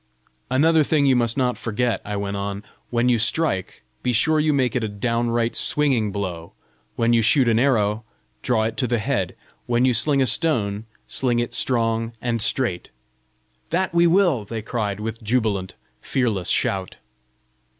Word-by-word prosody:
"Another 155 Hz, +5 st, +4 dB
thing 150 Hz, -1 st, +2 dB
you 135 Hz, -2 st, +4 dB
must 120 Hz, -1 st, 0 dB
not 125 Hz, -2 st, 0 dB
forget," 120 Hz, +1 st, -1 dB
I 105 Hz, -, -5 dB
went 100 Hz, 0 st, -3 dB
on: 100 Hz, +1 st, -4 dB, 0.3 s
"when 120 Hz, 0 st, +1 dB
you 120 Hz, -2 st, +3 dB
strike, 110 Hz, -, -1 dB, 0.2 s
be 125 Hz, -, 0 dB
sure 155 Hz, +7 st, +3 dB
you 150 Hz, 0 st, +2 dB
make 130 Hz, -4 st, +1 dB
it 125 Hz, -, 0 dB
a -, -, 0 dB
downright 115 Hz, +2 st, -1 dB
swinging 130 Hz, -8 st, +1 dB
blow; 90 Hz, -5 st, -5 dB, 0.4 s
when 115 Hz, 0 st, +2 dB
you 115 Hz, -, +4 dB
shoot 125 Hz, +3 st, +3 dB
an 115 Hz, -1 st, +3 dB
arrow, 110 Hz, -5 st, +1 dB, 0.4 s
draw 115 Hz, -3 st, +1 dB
it 110 Hz, 0 st, -3 dB
to 125 Hz, -, 0 dB
the 120 Hz, 0 st, +1 dB
head; 105 Hz, -5 st, -2 dB, 0.3 s
when 120 Hz, +1 st, +2 dB
you 130 Hz, -, +3 dB
sling 140 Hz, +5 st, +2 dB
a 135 Hz, -, +3 dB
stone, 110 Hz, -9 st, 0 dB, 0.2 s
sling 125 Hz, -3 st, -1 dB
it 120 Hz, 0 st, -2 dB
strong 115 Hz, -2 st, 0 dB
and 115 Hz, -1 st, -2 dB
straight." 115 Hz, -5 st, -1 dB, 0.8 s
"That 180 Hz, +1 st, -1 dB
we 170 Hz, 0 st, +4 dB
will!" 170 Hz, -, +3 dB
they 110 Hz, +1 st, -6 dB
cried 105 Hz, -3 st, -3 dB
with 110 Hz, +2 st, -5 dB
jubilant, 105 Hz, -5 st, -1 dB, 0.3 s
fearless 110 Hz, -9 st, -1 dB
shout. 95 Hz, -1 st, 0 dB
120 Hz, 170 wpm, -22 LUFS, 105-130 Hz, 0.8 s, Another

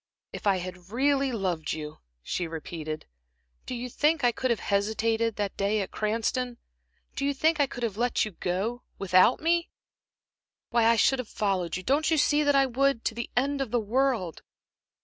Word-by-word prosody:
"If -, -, -4 dB
I 195 Hz, -2 st, +4 dB
had 180 Hz, 0 st, -8 dB
really 275 Hz, +3 st, +2 dB
loved 180 Hz, -8 st, -2 dB
you," 150 Hz, -1 st, -7 dB, 0.2 s
she 175 Hz, -, -2 dB
repeated 155 Hz, -1 st, -6 dB, 0.6 s
"do 255 Hz, -, -3 dB
you 245 Hz, +1 st, -4 dB
think 295 Hz, +4 st, +1 dB
I 245 Hz, -, +5 dB
could 255 Hz, +2 st, -2 dB
have 235 Hz, -, +1 dB
hesitated 220 Hz, +2 st, 0 dB
that 205 Hz, -2 st, -2 dB
day 200 Hz, +2 st, +1 dB
at 195 Hz, -, -5 dB
Cranston? 230 Hz, +3 st, -1 dB, 0.6 s
Do -, -, -3 dB
you 280 Hz, 0 st, +1 dB
think 315 Hz, +3 st, +2 dB
I 285 Hz, -, +4 dB
could 245 Hz, -1 st, -7 dB
have 215 Hz, -4 st, -2 dB
let 245 Hz, 0 st, +1 dB
you 215 Hz, -, -6 dB
go 200 Hz, +8 st, -2 dB, 0.2 s
without 185 Hz, +4 st, +4 dB
me? 335 Hz, +1 st, +1 dB, 1.0 s
Why, 235 Hz, -1 st, +3 dB
I 230 Hz, +1 st, +5 dB
should 265 Hz, +3 st, +3 dB
have 250 Hz, -, -5 dB
followed 190 Hz, -5 st, -1 dB
you 185 Hz, -, -7 dB
don't 290 Hz, -, +2 dB
you 320 Hz, -, +3 dB
see 295 Hz, 0 st, +3 dB
that 290 Hz, -1 st, +3 dB
I 275 Hz, 0 st, +5 dB
would? 265 Hz, -1 st, +1 dB
to -, -, 0 dB
the 235 Hz, +1 st, -5 dB
end 280 Hz, +2 st, +1 dB
of 265 Hz, -, -2 dB
the 240 Hz, -, +1 dB
world." 225 Hz, -, 0 dB
230 Hz, 190 wpm, -27 LUFS, 195-270 Hz, 1.0 s, I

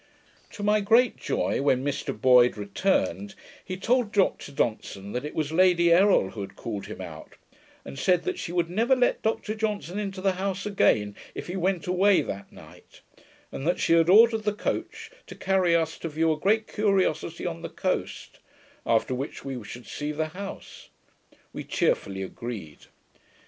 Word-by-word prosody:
To 205 Hz, -, -7 dB
my 210 Hz, +1 st, +3 dB
great 230 Hz, +5 st, +4 dB
joy, -, -, -1 dB
when 130 Hz, -2 st, +2 dB
Mr 145 Hz, 0 st, -3 dB
Boyd 125 Hz, -2 st, +5 dB
returned, 190 Hz, -, -1 dB, 0.3 s
he 185 Hz, -, -5 dB
told 240 Hz, +2 st, +1 dB
Dr 195 Hz, -8 st, +1 dB
Johnson 110 Hz, -7 st, -3 dB
that 125 Hz, -, -3 dB
it 150 Hz, -, -6 dB
was 155 Hz, -1 st, -1 dB
Lady 175 Hz, 0 st, +4 dB
Errol 185 Hz, -, +4 dB
who 105 Hz, -, -7 dB
had 95 Hz, -1 st, -8 dB
called 105 Hz, -4 st, -6 dB
him -, -, -8 dB
out, -, -, -10 dB, 0.5 s
and 70 Hz, -, -8 dB
said 180 Hz, -1 st, +2 dB
that 370 Hz, 0 st, -3 dB
she -, -, -5 dB
would 175 Hz, -1 st, 0 dB
never 230 Hz, +9 st, +2 dB
let 250 Hz, -1 st, +1 dB
Dr 220 Hz, -1 st, -1 dB
Johnson 210 Hz, -4 st, -3 dB
into 195 Hz, -2 st, -4 dB
the 190 Hz, +1 st, +2 dB
house 190 Hz, +1 st, -3 dB
again, 105 Hz, -, +2 dB, 0.2 s
if -, -, -6 dB
he 180 Hz, -, -5 dB
went 185 Hz, -1 st, -1 dB
away 185 Hz, +2 st, +3 dB
that 100 Hz, 0 st, -7 dB
night; -, -, -16 dB, 0.5 s
and 135 Hz, -, -5 dB
that 175 Hz, -, +1 dB
she -, -, +2 dB
had 165 Hz, 0 st, +4 dB
ordered 225 Hz, +3 st, +6 dB
the 210 Hz, -1 st, -1 dB
coach, 210 Hz, -, -4 dB, 0.2 s
to -, -, -10 dB
carry 190 Hz, -3 st, +2 dB
us 160 Hz, -1 st, -1 dB
to 165 Hz, -, -4 dB
view 160 Hz, +1 st, +1 dB
a 155 Hz, -, -2 dB
great 215 Hz, +5 st, +2 dB
curiosity 190 Hz, -6 st, 0 dB
on 85 Hz, 0 st, -4 dB
the -, -, -6 dB
coast, -, -, -3 dB, 0.5 s
after 115 Hz, +2 st, +2 dB
which 135 Hz, +3 st, -5 dB
we 130 Hz, -4 st, -5 dB
should 120 Hz, +4 st, -10 dB
see 150 Hz, 0 st, -4 dB
the 155 Hz, +1 st, -2 dB
house. 195 Hz, +4 st, -9 dB, 0.6 s
We -, -, -6 dB
cheerfully 95 Hz, -1 st, -1 dB
agreed. 100 Hz, -7 st, -8 dB
175 Hz, 175 wpm, -26 LUFS, 130-200 Hz, 0.6 s, ordered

